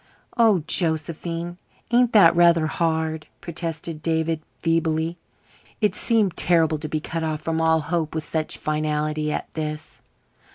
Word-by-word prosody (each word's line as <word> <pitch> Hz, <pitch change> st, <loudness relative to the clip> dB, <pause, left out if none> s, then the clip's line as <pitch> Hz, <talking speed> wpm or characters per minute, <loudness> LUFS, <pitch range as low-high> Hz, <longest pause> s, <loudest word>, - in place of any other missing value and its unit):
"Oh, 220 Hz, -, +4 dB
Josephine, 170 Hz, +1 st, 0 dB, 0.3 s
ain't 240 Hz, 0 st, +4 dB
that 195 Hz, -6 st, +7 dB
rather 170 Hz, -2 st, +5 dB
hard?" 160 Hz, -1 st, -1 dB
protested 165 Hz, -1 st, -5 dB
David 160 Hz, 0 st, 0 dB, 0.2 s
feebly. 165 Hz, 0 st, 0 dB, 0.6 s
It 210 Hz, -4 st, +2 dB
seemed 215 Hz, -6 st, +2 dB
terrible 160 Hz, -3 st, +3 dB
to 155 Hz, 0 st, -6 dB
be 155 Hz, -, -1 dB
cut 165 Hz, +2 st, -4 dB
off 155 Hz, -1 st, -2 dB
from 160 Hz, +1 st, -1 dB
all 160 Hz, 0 st, +3 dB
hope 160 Hz, 0 st, -2 dB
with 160 Hz, -, -2 dB
such 155 Hz, -1 st, -2 dB
finality 150 Hz, 0 st, -1 dB
as -, -, -2 dB
this. 155 Hz, 0 st, -5 dB
160 Hz, 135 wpm, -23 LUFS, 155-170 Hz, 0.6 s, that